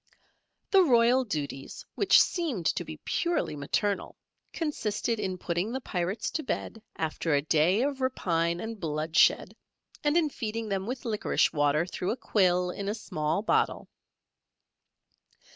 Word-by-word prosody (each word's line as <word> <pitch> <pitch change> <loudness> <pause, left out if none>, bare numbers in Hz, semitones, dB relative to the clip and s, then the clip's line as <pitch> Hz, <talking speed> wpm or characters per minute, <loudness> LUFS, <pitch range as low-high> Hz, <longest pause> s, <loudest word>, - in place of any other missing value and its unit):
The 390 -2 +7
royal 245 -3 +4
duties, 145 - -5
which - - +5
seemed 295 - 0
to - - +1
be - - -8
purely 340 - 0
maternal, 195 +8 -2 0.3
consisted 230 - -2
in 190 -3 -2
putting 175 +4 -2
the 260 - -2
Pirates 185 -2 -3
to 315 - -2
bed 225 -3 -4
after 160 -1 -1
a 140 - +2
day 165 - +3
of 275 -1 -2
rapine 170 -9 0
and 225 +1 -6
bloodshed, 155 -1 +2 0.5
and 295 +2 +3
in 315 -4 +2
feeding 225 -1 -4
them 195 0 -2
with 255 +2 -5
liquorice 215 -3 +1
water 145 +1 +2
through 180 0 -4
a 240 - -1
quill 180 -6 +2
in 200 +2 -4
a 210 - -1
small 155 -3 -2
bottle. - - +1
200 Hz, 145 wpm, -28 LUFS, 170-240 Hz, 0.5 s, The